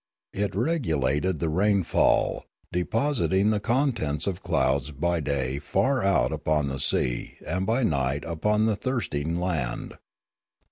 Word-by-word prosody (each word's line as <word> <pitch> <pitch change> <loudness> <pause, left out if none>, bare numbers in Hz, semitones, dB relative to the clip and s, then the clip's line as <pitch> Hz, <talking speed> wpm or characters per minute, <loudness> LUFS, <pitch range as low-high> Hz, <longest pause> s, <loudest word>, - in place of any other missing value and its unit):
It 100 +1 -1
regu 120 - 0
lated 75 +7 0
the 85 - -1
rainfall, 95 +2 +2 0.3
depositing 105 +1 +1
the 105 - +1
contents 115 - 0
of 95 -1 -3
clouds 65 -1 +1
by 85 +4 -1
day 70 -2 -1
far 130 - +1
out 95 -11 +2
upon 75 -2 0
the 65 0 -4
sea - - -1
and 90 +4 -2
by 120 +4 +1
night 70 - 0
upon 105 +7 +1
the 110 -2 +2
thirst 130 - -3
ing 80 +4 -1
land. 80 -10 -3
85 Hz, 140 wpm, -26 LUFS, 70-105 Hz, 0.3 s, rainfall